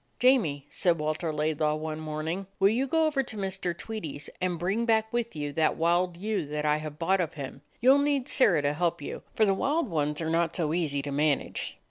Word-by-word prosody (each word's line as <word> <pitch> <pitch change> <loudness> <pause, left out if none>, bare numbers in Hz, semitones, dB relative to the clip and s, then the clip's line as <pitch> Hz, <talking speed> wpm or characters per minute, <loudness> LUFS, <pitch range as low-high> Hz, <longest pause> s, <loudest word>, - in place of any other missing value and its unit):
"Jamie," 200 - +3
said 175 -2 +2
Walter 155 +2 -1
Laidlaw 150 0 0
one 155 0 -4
morn 155 0 -4
ing, 185 +4 -3
"will 195 0 +6
you 250 +6 +1
go 320 +3 +2
over 300 -3 +2
to 230 -4 -5
Mr. 190 -3 -2
Tweedie's 160 -11 -6
and 180 -1 0
bring 190 +7 0
back 220 -1 +1
with 235 -4 -1
you 145 -1 -3
that 160 0 +2
wild 175 +1 +1
ewe 175 -7 -2
I 150 0 +3
have 155 -1 -7
bought 185 +3 +2
of 165 - -3
him? 135 -2 -7 0.2
You 255 +3 +7
'll 280 - +4
need 285 -2 +1
Sirrah 170 - +3
to 145 0 +1
help 170 +2 0
you, 145 - -6
for 220 - +4
the 195 - +3
wild 285 +7 0
ones 150 -2 0
are 160 -1 -2
not 170 0 +1
so 160 -3 0
easy 150 -5 0
to 145 - -4
man 145 0 +2
age." - - -6
170 Hz, 225 wpm, -28 LUFS, 150-215 Hz, 0.2 s, You